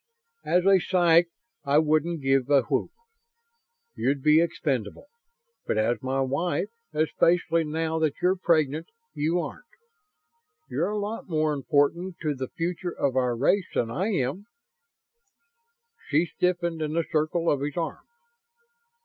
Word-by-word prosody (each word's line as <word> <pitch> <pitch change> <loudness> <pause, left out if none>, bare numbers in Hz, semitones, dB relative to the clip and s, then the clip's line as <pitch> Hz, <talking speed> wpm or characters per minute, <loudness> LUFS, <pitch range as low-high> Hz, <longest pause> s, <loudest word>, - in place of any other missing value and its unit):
"As 180 +1 +2
a 195 -1 +6
psych 175 -2 +3 0.3
I 140 +1 +2
wouldn't 155 +1 +1
give 135 0 +2
a 140 -3 +5
whoop. 115 - -1 1.0
You'd 140 0 -1
be 155 +1 +6
expendable. 150 - -2 0.6
But - - 0
as 110 +1 +1
my 130 +1 -1
wife, 155 +7 -1 0.2
especially 165 +1 +2
now 160 +1 -2
that 155 -3 +1
you're 185 +1 +2
pregnant, 160 -3 +1 0.3
you 160 +3 0
aren't. - - -6 1.0
You're 145 +8 -1
a 210 - -2
lot 210 0 -4
more 155 -2 +1
important 150 +6 0
to 150 -2 0
the 130 -1 -5
future 175 +1 -3
of 135 -2 0
our 125 -2 +1
race 185 - +2
than 115 -1 0
I 185 - -1
am." 185 - -2 1.6
She 155 +4 +3
stiffened 175 -2 -1
in 155 0 -2
the 165 0 0
circle 160 +2 0
of 145 -4 +2
his 145 +2 -4
arm. 165 -1 -4
155 Hz, 140 wpm, -26 LUFS, 140-175 Hz, 1.6 s, a